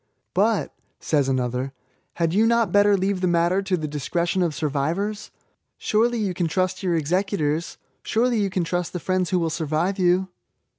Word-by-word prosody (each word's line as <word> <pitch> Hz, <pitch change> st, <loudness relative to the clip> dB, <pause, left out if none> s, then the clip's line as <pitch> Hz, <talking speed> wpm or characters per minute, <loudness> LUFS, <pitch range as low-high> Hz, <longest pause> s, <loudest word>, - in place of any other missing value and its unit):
'^But," -, -, +2 dB, 0.3 s
says 145 Hz, -3 st, +1 dB
another, 130 Hz, +1 st, -1 dB, 0.4 s
"had 165 Hz, -1 st, 0 dB
you 220 Hz, +4 st, +4 dB
not 235 Hz, -1 st, +2 dB
better 205 Hz, 0 st, +5 dB
leave 190 Hz, 0 st, -1 dB
the 185 Hz, -, +2 dB
matter 175 Hz, +2 st, +2 dB
to 195 Hz, -2 st, 0 dB
the 155 Hz, -2 st, -3 dB
discretion 170 Hz, +5 st, -1 dB
of 165 Hz, -4 st, 0 dB
survivors? 160 Hz, +9 st, -2 dB, 0.5 s
Surely 235 Hz, +3 st, +1 dB
you 205 Hz, -4 st, -1 dB
can 175 Hz, -1 st, -1 dB
trust 185 Hz, +2 st, -1 dB
your 180 Hz, -3 st, 0 dB
executors 165 Hz, -1 st, -1 dB, 0.3 s
/—surely 235 Hz, +1 st, +1 dB
you 200 Hz, -1 st, +1 dB
can. 185 Hz, -1 st, -1 dB
trust 175 Hz, +1 st, -2 dB
the 180 Hz, -, -3 dB
friends 185 Hz, 0 st, 0 dB
who 185 Hz, -, +1 dB
will 165 Hz, -2 st, 0 dB
survive 160 Hz, +5 st, -1 dB
you." 185 Hz, +1 st, +2 dB
180 Hz, 170 wpm, -23 LUFS, 160-195 Hz, 0.5 s, better